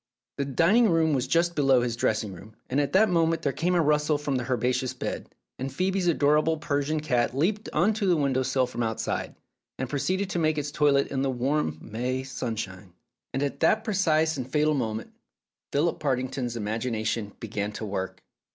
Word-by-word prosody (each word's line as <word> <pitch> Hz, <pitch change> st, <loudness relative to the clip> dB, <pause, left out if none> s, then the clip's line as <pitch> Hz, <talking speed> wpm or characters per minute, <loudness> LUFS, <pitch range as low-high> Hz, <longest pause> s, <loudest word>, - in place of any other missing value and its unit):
The 140 Hz, -, -1 dB
dining 185 Hz, -, +4 dB
room 160 Hz, -2 st, +3 dB
was 130 Hz, -3 st, 0 dB
just 170 Hz, +1 st, +2 dB
below 135 Hz, -4 st, +4 dB
his 120 Hz, -1 st, -1 dB
dressing 110 Hz, -3 st, 0 dB
room, 110 Hz, +5 st, -13 dB, 0.2 s
and 140 Hz, +3 st, +3 dB
at 140 Hz, -1 st, -2 dB
that 210 Hz, +4 st, +6 dB
moment 165 Hz, -2 st, +1 dB
there 140 Hz, -, +1 dB
came 180 Hz, +3 st, 0 dB
a 175 Hz, -, +4 dB
rustle 150 Hz, 0 st, +2 dB
from 145 Hz, -2 st, -2 dB
the 125 Hz, 0 st, -4 dB
herbaceous 125 Hz, +1 st, 0 dB
bed, -, -, -4 dB, 0.3 s
and 135 Hz, +1 st, -3 dB
Phoebe's 185 Hz, +2 st, 0 dB
adorable 155 Hz, 0 st, +3 dB
Persian 150 Hz, 0 st, -1 dB
cat 125 Hz, -3 st, 0 dB
leaped 205 Hz, +8 st, 0 dB
on 185 Hz, +8 st, +3 dB
to 205 Hz, -2 st, -1 dB
the 175 Hz, -2 st, +4 dB
window 135 Hz, -3 st, +1 dB
sill 130 Hz, 0 st, +1 dB
from 125 Hz, -1 st, -5 dB
outside, 110 Hz, -1 st, -2 dB, 0.4 s
and 130 Hz, -, -2 dB
proceeded 185 Hz, +9 st, -1 dB
to 175 Hz, -, -1 dB
make 155 Hz, -1 st, +1 dB
its 145 Hz, -1 st, -2 dB
toilet 145 Hz, -2 st, +3 dB
in 135 Hz, -, -1 dB
the 135 Hz, -, +1 dB
warm 130 Hz, -, 0 dB
May 125 Hz, +4 st, -3 dB
sun 125 Hz, -3 st, -4 dB
shine. 95 Hz, -3 st, -7 dB, 0.4 s
And 135 Hz, -, -1 dB
at 140 Hz, -, -3 dB
that 220 Hz, +1 st, +3 dB
precise 160 Hz, -7 st, +2 dB
and 130 Hz, -1 st, -5 dB
fatal 150 Hz, +1 st, +3 dB
moment 110 Hz, -5 st, -3 dB, 0.6 s
Philip 155 Hz, +4 st, +1 dB
Partington's 130 Hz, -3 st, -1 dB
imagination 110 Hz, -1 st, -2 dB
began 105 Hz, -2 st, -3 dB
to 110 Hz, -, -5 dB
work. 95 Hz, -2 st, -4 dB
140 Hz, 190 wpm, -27 LUFS, 120-160 Hz, 0.6 s, that